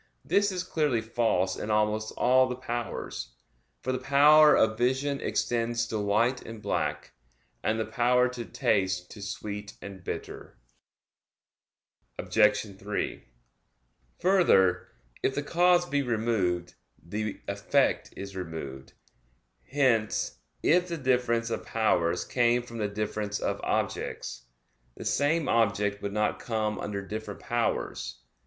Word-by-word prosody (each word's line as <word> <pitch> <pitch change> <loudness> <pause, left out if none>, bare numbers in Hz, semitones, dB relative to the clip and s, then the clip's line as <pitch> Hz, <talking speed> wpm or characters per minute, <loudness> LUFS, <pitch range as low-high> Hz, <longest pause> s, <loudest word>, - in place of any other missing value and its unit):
This 200 0 +2
is 180 -1 -2
clearly 150 -9 +1
false 110 -5 0
in 105 - -5
almost 105 0 +1
all 130 +1 +4
the 125 - -2
powers; 120 - -5 0.5
for 130 - -1
the 130 - -1
power 150 +3 +7
of 110 0 +3
vision 130 +4 0
extends 115 -1 0
to 110 - -2
white 110 +5 +1
and 115 -1 -9
black, 75 -6 -2 0.5
and 110 +1 0
the 110 - 0
power 125 +2 +3
to 125 -1 -6
taste 95 -3 0
to 105 - -10
sweet 105 +1 -6
and 95 -2 -9
bitter. - - -7 1.6
Obj. 105 -2 +2
3: 100 +1 -4 0.9
Further, 95 - +4 0.3
if 135 - 0
the 145 - -1
cause 175 +2 +3
be 145 -3 +1
removed, 105 -8 0 0.2
the 105 +4 -4
effect - - +1
is 100 0 -7
removed. 80 -7 -7 0.8
Hence 125 -6 +1 0.2
if 180 +2 +4
the 170 -1 -3
difference 125 -4 +1
of - - -2
powers 90 -6 +1
came 120 -1 +2
from 115 -1 -8
the 105 - 0
difference 105 0 -3
of - - -2
objects, - - -2 0.5
the - - -8
same 150 +2 +1
object 105 -3 +1
would 100 - -3
not 105 0 0
come 110 -2 -2
under 100 -1 -4
different 105 0 -6
powers. - - -2
110 Hz, 130 wpm, -28 LUFS, 100-125 Hz, 1.6 s, power